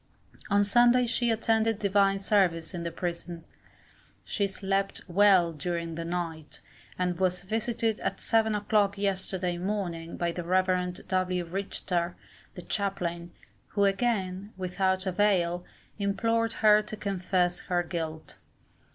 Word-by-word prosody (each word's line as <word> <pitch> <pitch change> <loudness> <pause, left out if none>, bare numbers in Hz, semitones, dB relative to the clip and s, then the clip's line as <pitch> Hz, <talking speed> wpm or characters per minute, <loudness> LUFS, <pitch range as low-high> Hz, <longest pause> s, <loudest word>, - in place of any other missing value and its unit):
On 205 0 +4
Sunday 240 +4 +5
she 240 0 0
attended 225 -1 +2
Divine 200 -1 +3
service 190 -4 +1
in 175 - -4
the 170 - -2
prison. 170 -1 -5 0.8
She 200 - 0
slept 195 0 -1
well 185 -2 +4
during 170 +2 -3
the 165 +1 -4
night, 165 -3 -4 0.4
and 180 -1 -1
was 180 -1 0
visited 225 +1 -1
at - - -2
seven 220 -1 +2
o'clock 205 -1 +1
yesterday 190 -3 -1
morning 175 -4 -3
by 170 -1 0
the 175 +1 -5
Rev. 180 0 0
W. 185 -1 0
Richter, 180 -1 -2 0.4
the 180 - -8
chaplain, 175 -4 -2 0.4
who 200 - 0
again, 195 -1 -1
without 190 +1 0
avail, 180 -2 +1 0.4
implored 225 +3 +1
her 210 0 +7
to 215 0 -7
confess 185 -3 0
her 175 -1 -1
guilt. 160 -2 -5
190 Hz, 125 wpm, -28 LUFS, 175-205 Hz, 0.8 s, her